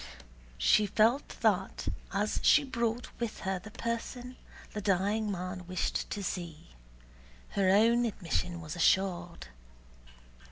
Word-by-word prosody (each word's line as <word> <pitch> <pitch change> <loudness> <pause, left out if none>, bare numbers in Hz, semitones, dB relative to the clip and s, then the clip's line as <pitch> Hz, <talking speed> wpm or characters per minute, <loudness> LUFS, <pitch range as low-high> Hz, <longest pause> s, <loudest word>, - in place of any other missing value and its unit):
She 210 -1 +4
felt 225 +7 +3
that - - +1 0.2
as - - 0
she 305 - +6
brought 235 -2 -2
with 235 -2 -3
her 190 -1 -1
the 215 - -11
person 235 +3 -4 0.4
the 210 - -3
dying 205 +2 +1
man 180 -1 -5
wished 185 -1 -2
to 205 - -4
see, 170 -3 -5 0.8
her 195 -2 +2
own 230 +5 +5
admission 175 -4 -2
was 155 0 -6
assured. 175 - +1
200 Hz, 120 wpm, -31 LUFS, 180-230 Hz, 0.8 s, she